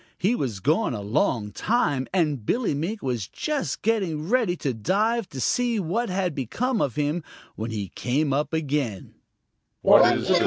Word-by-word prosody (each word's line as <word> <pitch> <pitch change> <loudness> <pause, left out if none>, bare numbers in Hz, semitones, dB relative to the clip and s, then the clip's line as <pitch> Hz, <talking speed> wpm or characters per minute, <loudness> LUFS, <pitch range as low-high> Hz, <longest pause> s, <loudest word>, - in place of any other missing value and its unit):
He 200 +6 +2
was 120 - -2
gone 155 - +1
a 105 - -5
long 105 0 0
time, 145 - 0
and 150 - +1
Billy 230 - 0
Mink 175 +9 -3
was 120 -7 -2
just 300 -2 -3
getting 185 -9 0
ready 225 -5 +2
to 140 -6 -2
dive 210 - 0
to 135 - -7
see 240 - +1
what 200 +7 -1
had 185 -2 -1
become 220 - -1
of 135 - 0
him 150 +3 -1 0.3
when 110 +2 -4
he 105 -4 -4
came 140 - 0
up 145 +1 0
again. 145 - -2
155 Hz, 155 wpm, -25 LUFS, 130-215 Hz, 0.3 s, He